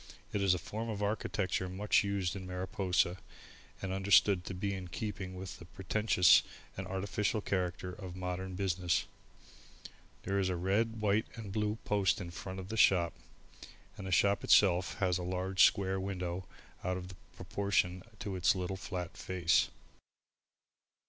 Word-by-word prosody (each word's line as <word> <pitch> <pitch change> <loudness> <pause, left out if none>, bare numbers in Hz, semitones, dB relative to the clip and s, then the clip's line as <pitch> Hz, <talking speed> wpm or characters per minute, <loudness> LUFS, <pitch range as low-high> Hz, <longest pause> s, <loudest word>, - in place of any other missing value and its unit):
It 105 - 0
is 95 -2 +4
a - - -1
form 110 +6 -5
of 105 -2 -3
architecture 100 -3 -1
much 100 +4 +2
used 100 -2 -1
in 95 -1 -6
Mariposa 90 -1 0 0.6
and 95 -1 -2
understood 95 -1 +4
to 95 - -5
be 100 +2 -2
in 95 -2 -5
keeping 95 0 -5
with 95 -4 -7
the 85 - -11
pretentious 95 0 +4 0.3
and 95 0 -5
artificial 100 +3 -1
character 90 -2 -2
of 90 -2 -8
modern 90 0 -4
business. 90 -2 0 1.2
There 100 +1 0
is 95 -1 +1
a 90 - 0
red, 105 +5 0
white 105 +1 +2
and 110 -4 -7
blue 105 0 0
post 100 -2 +2
in 90 -3 -6
front 95 +2 -6
of 95 0 -8
the 110 - -4
shop 85 -5 +4 0.8
and 95 - -7
the - - -4
shop 100 +2 +3
itself 90 -2 +4
has 90 -2 +1
a - - -4
large 95 +1 +2
square 95 -2 +1
window 90 -2 -4 0.4
out 90 0 -1
of 90 0 -7 0.2
proportion 95 -2 0 0.2
to 100 -2 -3
its 90 +1 +3
little 95 +1 -3
flat 90 -2 -5
face. 90 -3 +2
95 Hz, 155 wpm, -33 LUFS, 90-100 Hz, 1.2 s, is